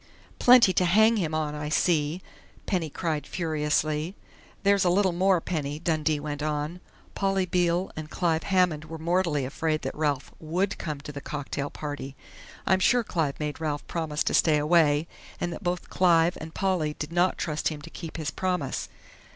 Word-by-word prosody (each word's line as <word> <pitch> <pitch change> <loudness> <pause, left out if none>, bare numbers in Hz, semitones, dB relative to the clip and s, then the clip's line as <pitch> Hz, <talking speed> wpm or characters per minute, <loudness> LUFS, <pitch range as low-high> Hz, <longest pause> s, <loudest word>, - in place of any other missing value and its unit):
"Plenty 245 -6 +7
to 180 - +2
hang 220 +6 +5
him 160 -5 -1
on, 155 -1 -1
I 150 0 -4
see!" 155 +1 +1 0.4
Penny 175 -5 -1
cried 155 -1 -3
furiously. 155 0 -1 0.5
"There's 200 -1 +4
a 180 - +3
little 190 +1 +3
more, 185 +1 +3
Penny," 150 -4 -3
Dundee 155 -2 0
went 145 0 -5
on. 150 +3 -2 0.3
"Polly 195 -1 +1
Beale 175 0 +1
and 155 -1 -6
Clive 165 -2 0
Hammond 180 -5 +1
were 160 +1 -7
mortally 170 -3 0
afraid 155 +3 -1
that - - -3
Ralph 145 -3 -1
would 180 +5 -1
come 150 -4 -4
to 150 - -7
the 140 -1 -7
cocktail 145 -1 -4
party! 145 -2 -6 0.5
I'm 190 - +3
sure 245 +5 +3
Clive 160 -9 -2
made 150 +1 -4
Ralph 150 -2 -2
promise 160 -3 -2
to - - -1
stay 155 -2 +4
away, 150 0 +3 0.3
and 175 -1 -2
that - - -8
both 180 -2 -3
Clive 170 -2 +4
and 160 +1 -7
Polly 175 -6 0
did 150 +1 -5
not 175 +1 +2
trust 155 -2 -2
him 155 -2 -3
to 165 - -9
keep 165 -2 -7
his 155 -2 -3
promise. 180 -7 -2
160 Hz, 175 wpm, -27 LUFS, 150-180 Hz, 0.5 s, Plenty